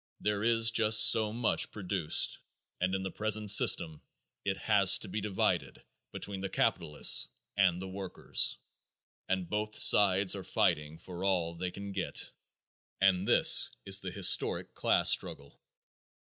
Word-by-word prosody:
There 105 -1 -3
is 115 0 +2
just 110 -1 +6
so 110 -2 0
much 115 +1 -3
produced, 95 -5 -2 0.4
and 95 +2 -2
in 95 - -5
the 95 - -6
present 105 -1 -1
system 80 -6 +3 0.4
it 95 -1 -4
has 95 -1 +4
to - - -10
be 105 +3 -6
divided 100 -2 -3 0.3
between 100 -1 -7
the 95 0 -6
capitalists 85 -4 +1 0.3
and 95 -3 0
the 95 - -8
workers, 95 0 -2 0.7
and 95 -2 -3
both 105 +2 -5
sides 100 -1 +4
are 95 - -8
fighting 75 -2 -2
for 90 +1 -11
all 90 -4 -2
they 90 +2 -6
can 100 +2 -10
get, - - -5 0.7
and 95 -1 0
this - - +4 0.2
is - - +3
the - - -7
historic - - +1
class - - +2
struggle. 70 0 -2
95 Hz, 145 wpm, -29 LUFS, 90-105 Hz, 0.7 s, just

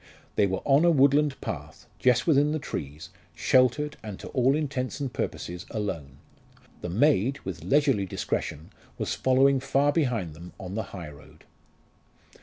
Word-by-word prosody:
They 100 - +3
were 95 0 -3
on 140 +3 +5
a 175 - +6
woodland 145 -1 +3
path, - - -6
just 125 0 +3
within 150 -1 +3
the - - 0
trees, 75 - -6 0.3
sheltered, 130 +4 +2
and 105 -3 -7
to - - -8
all 130 +2 +2
intents 140 -3 -2
and 135 -3 -3
purposes 90 +4 -4
alone. 80 - -4 0.6
The 90 - -4
maid, 130 - +2
with 85 -4 -6
leisurely 135 - +2
discretion, 80 -2 -3 0.3
was - - -2
following 135 +1 +3
far 140 +2 +2
behind 125 - 0
them 85 +3 -11
on 95 0 -7
the 110 0 -2
high 85 -6 -8
road. 70 - -17
125 Hz, 155 wpm, -27 LUFS, 95-140 Hz, 0.6 s, a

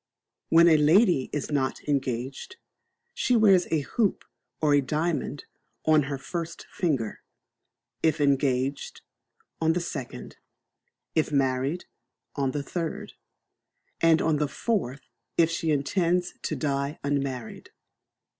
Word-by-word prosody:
When 170 +1 +7
a 160 -2 +6
lady 160 - +4
is 145 0 -3
not 135 -3 0
engaged, 135 - -2 0.6
she 250 - +1
wears 195 -5 +5
a 160 -2 +1
hoop 205 - -1 0.3
or 145 -2 +4
diamond 150 +1 -2 0.4
on 155 -3 +4
her 140 - -2
first 165 +4 -6
finger; 140 - -1 0.8
if 160 0 +2
engaged, 140 - 0 0.6
on 160 0 +3
the 175 - 0
second; 165 -7 -6 0.8
if 155 -1 +1
married, 135 +4 0 0.5
on 140 -2 0
the 140 +2 -3
third; 165 +1 -4 0.9
and 165 -1 +4
on 160 -2 +2
the 150 0 0
fourth 140 - -2 0.4
if 165 -1 +4
she 165 0 -2
intends 175 +4 +1
to - - -2
die 140 0 -2
unmarried. 135 -4 -3
150 Hz, 115 wpm, -26 LUFS, 140-170 Hz, 0.9 s, When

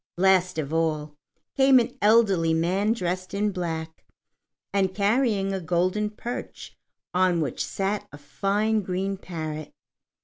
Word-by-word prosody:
Last 185 -1 +3
of 155 -1 -3
all 155 -2 0 0.4
came 270 -1 +6
an 235 -2 +1
elderly 200 -7 +4
man 185 +6 +1
dressed 185 -3 -3
in 205 +1 +1
black, 165 -3 -5 0.7
and 190 -2 +1
carrying 205 -2 +1
a 190 - -2
golden 180 +5 0
perch 235 +3 -7 0.4
on 180 -1 +3
which 145 -6 -2
sat 195 +1 -2
a 145 - -10
fine 200 +10 0
green 190 +1 -2
parrot. 155 -5 -6
185 Hz, 130 wpm, -25 LUFS, 165-205 Hz, 0.7 s, came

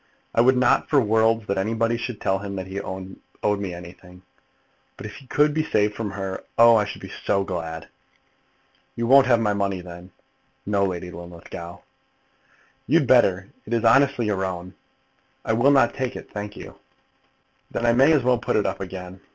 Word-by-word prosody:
I 115 - +4
would 130 +2 +4
not 125 - +2
for 145 - +4
worlds 110 -1 +2
that 100 -1 -1
anybody 115 +3 0
should 120 -1 -5
tell 95 0 0
him 100 0 -6
that 95 -1 -4
he 95 +1 -5
owed 95 0 -8 0.4
me 100 -2 -4
anything; 90 +1 -12 0.7
but - - -9
if 105 - -8
he 135 - -15
could 150 +3 +2
be 155 - +1
saved 105 -8 +1
from 105 0 -4
her, 95 -1 -5
oh, 115 0 +7
I 105 -2 +3
should - - -8
be - - -8 0.2
so 100 - +2
glad." 80 -3 -5 1.1
"You 115 - -2
won't 135 +2 +6
have 120 -2 +4
my 105 -2 +1
money, 100 -2 -1
then?" 90 0 -11 0.6
"No, 100 -1 +1
Lady 90 -1 -4
Linlithgow." 85 0 -10 1.1
"You'd 150 +3 +3
better. 100 -7 +3 0.2
It 120 - -1
is 115 0 -1
honestly 135 +1 +4
your 100 -3 -1
own." 90 -1 -5 0.7
"I 110 - +1
will 120 +5 +4
not 135 -4 +4
take 130 -2 -3
it, - - -10
thank 105 0 -6
you." - - -11 0.9
"Then 120 - -3
I 115 - +4
may 135 +6 +5
as 150 -5 +3
well 125 -1 +2
put 120 - -2
it 105 - +2
up - - -2
again." 95 0 -8
105 Hz, 190 wpm, -23 LUFS, 95-120 Hz, 1.1 s, oh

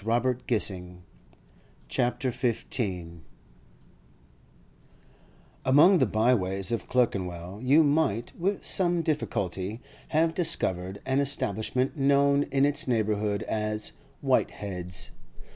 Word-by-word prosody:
CHAPTER 120 +3 +2
XV 125 -2 -1 1.3
SUNLIGHT 125 +2 0
IN 130 - +2
DREARY 120 -1 0 0.2
PLACES 90 -8 -1 2.5
Among 160 +8 +6
the 130 - +3
byways 100 -4 +1
of 115 - -2
Clerkenwell 95 -5 -1
you 140 +5 +5
might, 145 -7 +1
with 195 +3 -1
some 175 -2 +1
difficulty, 105 - -2 0.3
have 160 +1 +2
discovered 95 - -1
an 130 +1 +1
establishment 130 - -1
known 140 +1 +3
in 135 0 +3
its 145 -1 +1
neighbourhood 105 -3 0
as 105 0 -1 0.3
'Whitehead's. 90 -3 -1
120 Hz, 100 wpm, -27 LUFS, 100-140 Hz, 2.5 s, Among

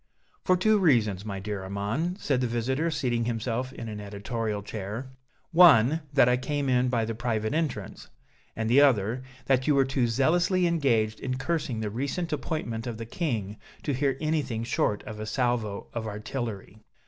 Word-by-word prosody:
"For 185 - +3
two 215 +3 +3
reasons, 110 - +3
my 100 -2 -4
dear 100 0 -4
Armand," 105 - -2
said 135 -3 0
the 125 - +1
visitor, 130 +7 0
seating 120 -6 0
himself 120 +2 -2
in 115 - -7
an 105 -1 -6
editorial 105 +1 -3
chair: 110 +6 -6 0.4
"one, 160 -4 +6
that 135 -4 +5
I 125 0 +4
came 145 +1 -2
in 125 0 +3
by 115 -3 +1
the 115 - -3
private 110 -1 -1
entrance, 155 -3 -3 0.5
and 110 0 -2
the 125 +5 +6
other, 120 -3 +3 0.2
that 130 0 +2
you 150 - +4
were 135 -1 +4
too 130 -2 +1
zealously 170 - +2
engaged 120 -10 +1
in 130 0 -3
cursing 135 -6 -2
the 105 -2 -2
recent 140 - -2
appointment 125 -6 -3
of 115 -2 -4
the 115 - -6
King 110 - -3 0.3
to 145 - -1
hear 135 0 0
anything 145 -8 -1
short 110 -3 0
of 110 -1 -8
a 110 - -5
salvo 115 -3 -1
of 115 -2 -3
artillery." 105 -1 -5
120 Hz, 175 wpm, -27 LUFS, 110-140 Hz, 0.5 s, one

